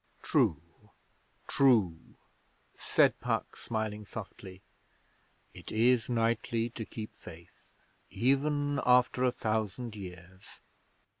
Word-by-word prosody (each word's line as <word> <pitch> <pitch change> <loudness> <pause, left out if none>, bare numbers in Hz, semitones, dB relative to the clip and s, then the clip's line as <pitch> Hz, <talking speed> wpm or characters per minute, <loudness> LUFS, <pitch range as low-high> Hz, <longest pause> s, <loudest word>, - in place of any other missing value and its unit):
'True - - +2 0.9
true,' 110 -12 +2 0.6
said - - +2
Puck, - - -2
smiling 110 -2 -4
softly. 95 -2 -9 0.9
'It - - -10
is 120 +2 +3
knightly 115 0 0
to 110 -1 -6
keep 110 0 -8
faith 85 0 -15 0.3
even 145 +5 +1
after 125 0 +4
a 125 - +3
thousand 110 0 -2
years.' 90 -1 -11
110 Hz, 90 wpm, -31 LUFS, 100-125 Hz, 0.9 s, after